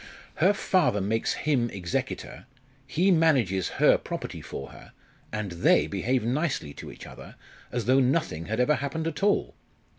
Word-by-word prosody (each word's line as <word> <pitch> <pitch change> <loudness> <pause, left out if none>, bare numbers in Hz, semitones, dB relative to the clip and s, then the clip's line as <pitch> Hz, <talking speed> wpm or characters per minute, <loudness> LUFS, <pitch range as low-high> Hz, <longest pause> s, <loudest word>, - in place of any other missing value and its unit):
"Her 185 +5 +5
father 185 - +2
makes 110 +4 0
him 130 -6 +2
executor 90 +5 -4 0.4
he 185 +7 +2
manages 130 - +2
her - - +5
property - - -6
for 70 - -7
her - - -14 0.4
and 105 -3 -3
they 85 0 +3
behave 120 +5 -1
nicely 135 - -1
to - - -9
each - - -11
other, - - -12 0.4
as 120 -3 -2
though 130 +3 +4
nothing 130 - 0
had 110 +2 -2
ever 125 +5 +4
happened 140 +4 -3
at 165 -2 -3
all. 205 0 +2
125 Hz, 155 wpm, -27 LUFS, 100-155 Hz, 0.4 s, Her